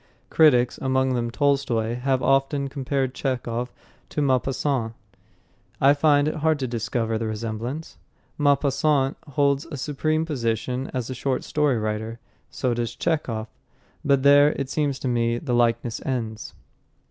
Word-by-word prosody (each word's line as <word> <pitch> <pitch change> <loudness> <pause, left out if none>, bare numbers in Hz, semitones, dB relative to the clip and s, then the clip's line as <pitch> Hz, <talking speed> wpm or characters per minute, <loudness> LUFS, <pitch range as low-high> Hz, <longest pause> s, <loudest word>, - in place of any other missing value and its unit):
Critics, 125 -6 +4
among 130 0 +1
them 120 -1 -1
Tolstoy, 125 -4 +1
have 130 +1 0
often 135 +1 +1
compared 135 -1 -2
Chekhov 125 -3 -3 0.4
to - - -4
Maupassant. 130 -3 0 0.9
I 140 +1 +6
find 145 0 +3
it 155 - -2
hard 155 0 +2
to 130 -2 -2
discover 115 -1 -2
the 115 - -2
resemblance. 115 +7 -5 0.4
Maupassant 140 -1 +2
holds 140 +1 +1
a 155 -3 -6
supreme 155 +3 -1
position 125 -2 -2
as 130 -1 -3
a - - -2
short 130 +1 -2
story 150 -4 +1
writer; 110 +1 -3 0.3
so 125 -2 -1
does 120 0 -3
Chekhov. 130 -10 -1 0.6
But 140 -2 +2
there, 145 +1 +6
it 135 -1 -4
seems 145 -3 0
to 130 - -4
me, 120 -1 +1
the 125 0 -3
likeness 120 -1 +1
ends. 115 -5 -4
130 Hz, 140 wpm, -24 LUFS, 120-145 Hz, 0.9 s, I